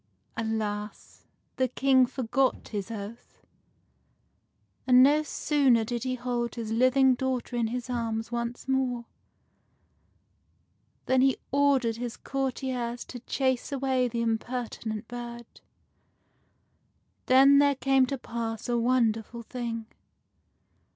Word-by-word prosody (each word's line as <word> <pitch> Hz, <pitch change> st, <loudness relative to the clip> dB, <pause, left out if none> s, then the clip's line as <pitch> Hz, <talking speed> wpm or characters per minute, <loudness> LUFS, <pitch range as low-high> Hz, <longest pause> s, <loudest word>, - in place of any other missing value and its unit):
Alas! 215 Hz, -2 st, -4 dB, 0.3 s
the 260 Hz, -, +2 dB
King 260 Hz, 0 st, +3 dB
forgot 260 Hz, +1 st, -1 dB
his 205 Hz, -1 st, -4 dB
oath, 220 Hz, +1 st, -9 dB, 1.4 s
and 250 Hz, 0 st, +7 dB
no 295 Hz, +3 st, +5 dB
sooner 280 Hz, -5 st, +2 dB
did 235 Hz, +1 st, -3 dB
he 255 Hz, 0 st, -1 dB
hold 240 Hz, -1 st, -3 dB
his 225 Hz, -2 st, -5 dB
living 255 Hz, +3 st, +4 dB
daughter 255 Hz, -1 st, -2 dB
in 235 Hz, -2 st, +1 dB
his 245 Hz, +2 st, -4 dB
arms 230 Hz, -2 st, -3 dB
once 235 Hz, +1 st, -4 dB
more 255 Hz, -3 st, 0 dB, 2.0 s
than 260 Hz, 0 st, +3 dB
he 265 Hz, -1 st, +3 dB
ordered 270 Hz, -5 st, +2 dB
his 240 Hz, -1 st, -5 dB
courtiers 260 Hz, -3 st, -3 dB
to 245 Hz, -, -8 dB
chase 260 Hz, +1 st, -1 dB
away 265 Hz, -2 st, +1 dB
the 235 Hz, -1 st, -2 dB
impertinent 225 Hz, -1 st, -3 dB
bird. 235 Hz, 0 st, -7 dB, 1.8 s
Then 275 Hz, +2 st, +7 dB
there 285 Hz, -1 st, +4 dB
came 270 Hz, -1 st, +3 dB
to 275 Hz, -, -3 dB
pass 230 Hz, -2 st, -5 dB
a 240 Hz, -1 st, +1 dB
wonderful 235 Hz, -1 st, 0 dB
thing. 230 Hz, -2 st, -5 dB
245 Hz, 110 wpm, -28 LUFS, 230-260 Hz, 2.0 s, and